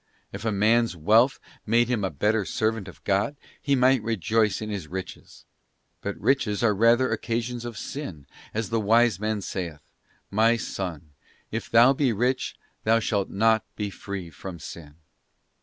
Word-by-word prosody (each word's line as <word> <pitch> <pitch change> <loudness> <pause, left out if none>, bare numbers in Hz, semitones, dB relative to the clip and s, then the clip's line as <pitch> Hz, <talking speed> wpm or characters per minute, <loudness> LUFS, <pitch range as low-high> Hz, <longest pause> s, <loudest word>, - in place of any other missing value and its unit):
If 100 +3 -6
a 110 - +1
man's 110 +1 +3
wealth 110 - +4 0.2
made 115 +2 +3
him 120 -4 0
a 95 - +1
better 105 +8 +1
servant 110 0 -1
of 90 - -13
God, 100 +8 +1 0.3
he 140 - +2
might 130 -1 +4
rejoice 110 0 +1
in 110 -1 -5
his 95 -6 -4
riches; 95 +1 -8 0.6
but 100 - -4
riches 115 -3 +1
are 110 -3 +4
rather 115 +5 +4
occasions 115 +1 -2
of 120 -3 -6
sin, 95 - -6 0.3
as 110 -2 -3
the 115 - +2
Wise 115 -1 +3
Man 110 0 -1
saith: 85 -5 -5 0.5
'Myson... 100 -8 0 0.4
if 115 +1 -4
thou 120 +4 +6
be 135 -2 +1
rich, 125 +5 0 0.3
thou 115 +1 +4
shalt 105 -3 0
not 110 +2 +3
be 105 -2 -3
free 95 -4 -6
from 90 +3 -8
sin. 75 -2 -10
110 Hz, 155 wpm, -26 LUFS, 100-115 Hz, 0.6 s, thou